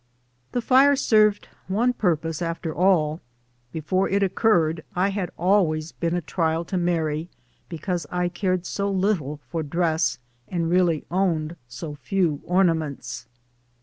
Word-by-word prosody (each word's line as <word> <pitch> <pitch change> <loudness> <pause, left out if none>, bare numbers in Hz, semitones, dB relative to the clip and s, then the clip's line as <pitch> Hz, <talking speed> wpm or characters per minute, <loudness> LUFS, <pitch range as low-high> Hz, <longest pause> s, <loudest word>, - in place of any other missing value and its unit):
The 245 - -1
fire 275 +3 +5
served 215 -6 +3 0.2
one 230 +6 +1
purpose 165 -6 -1
after 165 -1 -3
all. 165 -3 +2 0.5
Before 185 +6 0
it 200 +1 +2
oc 190 - +1
curred 170 -8 +2
I 185 +2 +2
had 195 -3 -2
always 165 -4 +2
been 170 0 -2
a 175 - -1
trial 165 0 -1
to 185 - -3
Mary 165 -2 -1 0.4
because 175 -1 -3
I 180 0 0
cared 185 0 -1
so 200 +2 -2
little 185 -7 0
for 165 -2 -1
dress 160 +1 0 0.3
and 170 -2 -1
really 175 -4 +2
owned 170 -4 0
so 130 +6 -7
few 160 -1 -1
ornaments. 160 -9 0
175 Hz, 140 wpm, -24 LUFS, 160-195 Hz, 0.5 s, fire